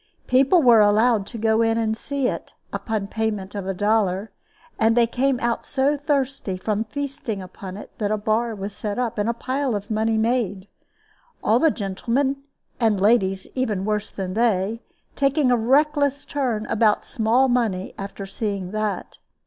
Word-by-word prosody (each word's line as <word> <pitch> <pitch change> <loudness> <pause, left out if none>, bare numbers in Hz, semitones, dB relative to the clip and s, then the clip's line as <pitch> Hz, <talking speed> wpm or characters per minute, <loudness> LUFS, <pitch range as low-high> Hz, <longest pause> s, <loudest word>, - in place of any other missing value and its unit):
People 275 +6 +4
were 235 -3 +7
allowed 210 0 +4
to - - -7
go 220 0 +2
in 225 0 +2
and 220 -1 0
see 275 +3 -2
it - - -5 0.2
upon 220 -3 -2
payment 210 -2 -3
of 200 -2 -5
a 195 - -1
dollar, 205 0 +1 0.5
and 225 +1 +3
they 235 - +6
came 255 +2 0
out 235 0 -1
so 280 +2 +1
thirsty 275 -8 -1
from 210 +3 -1
feasting 275 -4 -4
upon 185 0 -8
it - - -10
that 205 -2 0
a 215 - +1
bar 220 +2 0
was 200 0 -6
set 205 -1 -4
up, 240 -4 -2
and 205 +2 +1
a - - +1
pile 260 0 -1
of 205 +1 -5
money 220 +1 +1
made 220 -4 0 0.8
all 225 +3 +4
the 320 - +5
gentlemen, 240 +5 -1 0.4
and 220 -4 +2
ladies 195 -2 +2
even 215 -7 -1
worse 210 0 -1
than 185 -2 -5
they, 220 0 +1 0.3
taking 275 -1 +2
a - - +5
reckless 285 +4 +2
turn 245 -7 -1
about 215 -1 +2
small 240 +2 +2
money 225 -7 0
after 195 0 -6
seeing 195 -2 -4
that. 215 -1 -3
220 Hz, 170 wpm, -23 LUFS, 205-250 Hz, 0.8 s, were